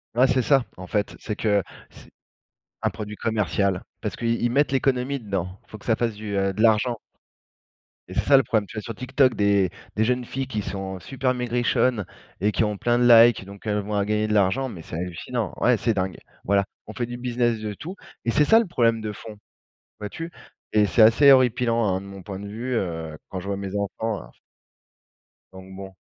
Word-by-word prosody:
Ouais, 125 +2 +5
c'est 130 -1 +2
ça, 135 +2 +4
en 95 - -8
fait, 100 +3 -2
c'est 105 - -4
que 105 -3 +1 0.3
c'est - - -17 0.7
un - - +1
produit 105 0 -7
commercial 100 -4 0 0.2
parce - - -3
qu'ils 115 0 0
mettent 140 +3 +2
l'économie 135 0 +1
dedans. 95 -4 -4
Il - - -26
faut 110 - -9
que - - -18
ça 115 - +3
fasse 115 -1 -1
du, 105 -1 -5
heu, 95 0 +1
de 105 - -3
l'argent 115 +2 +3 1.1
et - - -8
c'est - - +1
ça, 140 - +6
le 135 - +6
problème, 110 -4 0
tu - - -12
vois? - - -2
Sur 115 +1 -7
TikTok, 130 +2 +2
des 100 -2 +3 0.3
des 110 - +2
jeunes 125 +2 0
filles 135 +2 -4
qui 110 -5 -3
sont 95 -1 -5
super 130 +2 -1
maigrichonnes 120 -2 +1 0.4
et 105 +2 +2
qui 110 - +1
ont 105 -1 -2
plein 120 +3 +1
de 125 - +3
likes, 115 -3 +7
donc 100 +2 -12
elles 105 -1 0
vont 105 +1 -3
à 100 - +2
gagner 105 +1 0
de 105 - -1
l'argent, 105 +6 +2
mais 95 -9 -8
c'est 80 - -7
hallucinant. 90 +6 -4
Ouais, 125 -1 +4
c'est 115 +1 +1
dingue. 95 -3 -2 0.3
Voilà, 100 0 +2 0.2
on 110 - -8
fait 120 - -2
du 120 +1 -7
business 120 -2 0
de 105 -1 -4
tout 170 - -8 0.3
et 115 - +2
c'est 150 - +4
ça, 225 +9 +6
le 230 - 0
problème 115 -8 +2
de 110 -1 -4
fond, 105 0 -10 0.6
vois-tu? 160 +11 -6 0.4
Et 105 -1 +4
c'est 115 - +3
assez 115 +6 +7
horripilant, 120 -3 +4
hein, 95 -2 0
de 100 - -11
mon 100 -1 -10
point 95 +1 -7
de 100 - -7
vue, 120 +5 -4
heu, 80 -6 -3
quand 95 - -5
je 90 - -10
vois 100 0 -2
mes 100 0 -4
enfants, 100 +1 -2
hein - - -14 1.2
donc 95 0 -12
bon. 95 0 -9
110 Hz, 220 wpm, -24 LUFS, 100-120 Hz, 1.2 s, likes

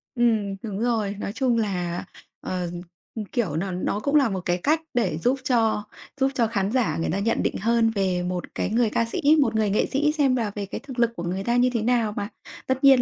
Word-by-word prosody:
Ừm, 220 -5 +2
đúng 205 -3 -4
rồi. 225 -4 0
Nói 200 - -4
chung 250 -2 +1
là, 180 -5 -2 0.4
ờ, 180 -2 -3 0.6
kiểu, 205 - -1
n 180 +1 -2
nó 205 - 0
cũng 280 +7 0
là 275 -6 +5
một 190 - -2
cái 175 0 +1
cách 310 - +1
để 200 -10 +1
giúp 250 +10 +1
cho 225 -5 +2 0.4
giúp 270 0 +2
cho 235 -3 +2
khán 200 -3 -1
giả 250 -2 +1
người 165 - -1
ta 195 - -1
nhận 230 +3 0
định - - -1
hơn 230 +2 +2
về 185 -3 +1
một 180 0 -4
cái - - -1
người 230 +1 +2
ca 230 - +1
sĩ, 230 - -4 0.2
một 265 - +1
người 215 -1 +2
nghệ 200 - +2
sĩ 300 +2 +1
xem 285 -4 +2
là 225 -5 -1
về 200 -1 -3
cái 195 - -6
thực 260 -1 -8
lực 235 -1 +3
của 170 - -5
người 185 +3 -2
ta 235 +2 +1
như 250 +1 +4
thế 230 - 0
nào 230 -2 +2
mà, 205 +1 -2 0.4
tất 260 +1 -1
nhiên 270 -2 +7
225 Hz, 240 wpm, -24 LUFS, 195-245 Hz, 0.6 s, nhiên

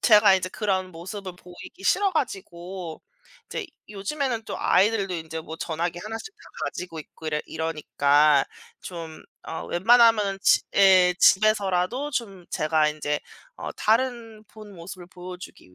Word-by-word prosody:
제가 210 -3 +6
이제 185 0 -3
그런 190 -2 -1
모습을 185 +2 -8
보이기 180 +2 -13
싫어 390 - +3
가지고. 185 - -4 0.4
이제 - - -5 0.2
요즘에는 230 +4 -3
또 - - -5
아이들도 195 -1 +2
인제 160 -1 -5
뭐 160 0 -8
전화기 170 +1 -3
하나씩 225 - -6
다 - - -30 0.2
가지고 170 -2 -5
있고 155 +1 -10
이러 150 -1 0
이러니까 150 -2 +2 0.4
좀 165 -3 -8 0.2
어 160 - -5
웬만하면은 215 0 +4
지 - - +5 0.2
예 185 -2 +6
집에서라도 210 +6 +3
좀 200 -8 -4
제가 155 0 +2
인제 150 -1 -2 0.4
어 - - -6
다른 225 -1 0
본모습을 190 -4 -11
보여주기 180 - -11
185 Hz, 300 characters per minute, -25 LUFS, 165-215 Hz, 0.4 s, 제가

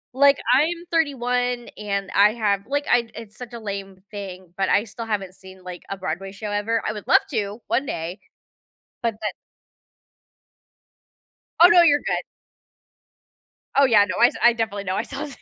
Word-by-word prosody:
Like, 280 +1 +5 0.2
I'm 335 +5 +2
31 250 -6 0
and 200 -2 -3
I 205 +2 +6
have, 205 -2 0
like, 285 +1 -1
I 235 -2 +3
it's 215 -2 -10
such 245 -2 -9
a 235 - -6
lame 195 -2 -7
thing, 185 -4 -8
but 195 -1 0
I 205 - +3
still 230 +1 -8
haven't 195 -4 -3
seen, 190 -1 -14
like, 180 -1 -8
a 195 - -4
Broadway 190 +1 -4
show 205 +1 -6
ever. 215 +2 -1
I 215 - -1
would 210 -2 -9
love - - +6
to 205 +2 -2
one 270 +3 0
day, 170 +4 -4 0.8
but 230 -2 0
that - - -2 2.3
Oh 350 - +11
no, 345 0 +7
you're 290 -3 +5
good. - - -2 1.5
Oh 280 0 +6
yeah, 215 -5 +5
no, - - -4
I 240 - +8
s - - -5
I 240 - +7
definitely 215 -3 -3
know. 185 -1 -2
I - - -1
saw 280 +4 -6
215 Hz, 175 wpm, -23 LUFS, 195-250 Hz, 2.3 s, Oh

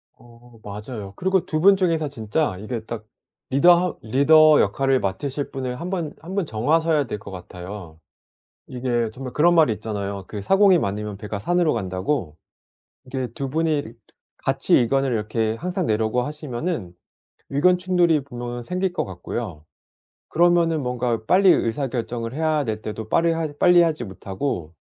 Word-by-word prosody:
어 120 0 -19
맞아요. 105 0 -7
그리고 190 - +1
2 155 - -1
분 195 +4 +6
중에서 165 -5 +1
진짜 120 -1 -1
이게 110 +1 -5
딱 115 -2 -6 0.4
리더 140 +7 +6
하 175 0 0
리더 150 +6 +5
역할을 135 +6 +1
맡으실 140 +9 -3
분을 125 -2 -4
한번 175 -4 -3
1 180 +4 -7
분 195 -4 0
정하셔야 150 +6 +1
될 105 - -4
것 100 -2 -10
같아요. 90 -2 -9 0.7
이게 120 -3 -1
정말 130 0 -7
그런 175 +3 +4
말이 155 -9 +5
있잖아요, 100 -2 -5
그 105 - -5
사공이 195 - +5
많으면 105 -3 -3
배가 105 0 -5
산으로 175 - +1
간다고. 95 - -2 0.7
이게 130 0 -3
2 135 +4 -5
분이 155 -1 0 0.6
같이 - - +2
의견을 135 +2 +1
이렇게 110 0 -1
항상 180 - -3
내려고 110 +3 +1
하시면은 145 - -4 0.6
의견 180 +6 +3
충돌이 175 -4 +2
분명 120 -2 -6
생길 180 +6 -2
것 - - -1
같고요. 90 -3 -6 0.6
그러면은 170 -2 +3
뭔가 125 -3 -1
빨리 190 - +5
의사 130 +4 +1
결정을 120 -1 -4
해야 155 -1 +1
될 110 -3 -3
때도 110 0 -6
빠리할 165 -3 +1
빨리 175 -1 +6
하지 155 -7 -1
못하고 95 - -4
130 Hz, 315 characters per minute, -23 LUFS, 110-160 Hz, 0.7 s, 분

